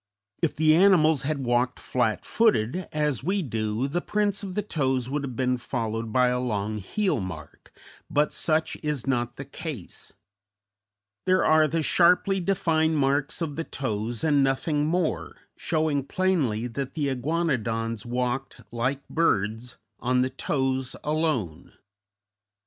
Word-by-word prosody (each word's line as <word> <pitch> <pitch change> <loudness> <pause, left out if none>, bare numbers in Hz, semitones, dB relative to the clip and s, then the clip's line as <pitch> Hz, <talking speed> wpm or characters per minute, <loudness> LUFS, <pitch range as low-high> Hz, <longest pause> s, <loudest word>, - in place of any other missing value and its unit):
If 165 - +1
the 155 0 +4
animals 165 -6 +5
had 140 -1 -2
walked 120 +1 +1
flat 120 -4 -1
footed, 185 - +1
as 150 -5 0
we 190 +4 0
do, 110 -1 -1
the 175 +5 -1
prints 205 0 0
of 190 -3 -6
the 210 - 0
toes 130 - -1
would 145 0 -1
have 130 -3 -5
been 125 +1 +1
followed 115 -2 -3
by 125 +1 +4
a 125 0 0
long 105 -3 -2
heel 190 - 0
mark, 85 -6 -8 0.4
but 150 +1 +1
such 160 0 0
is 150 -5 -2
not 120 -3 -1
the 135 - -7
case; 140 - -8 1.1
there 185 0 +4
are 155 0 +5
the 160 +1 -1
sharply 180 +4 +4
defined 160 -4 +1
marks 140 +3 0
of 150 -3 -4
the 165 - -1
toes 115 -5 -3
and 145 -3 +4
nothing 145 +3 +1
more, 175 0 -1 0.2
showing 155 -4 0
plainly 140 - 0
that 130 +2 -5
the 150 -3 0
Iguanodons 125 -6 -1
walked, 125 +2 -2
like 130 +4 -2
birds, 110 -6 0 0.2
on 125 +1 +2
the 130 - -2
toes 130 -1 -1
alone. 150 - -1
135 Hz, 145 wpm, -26 LUFS, 120-160 Hz, 1.1 s, animals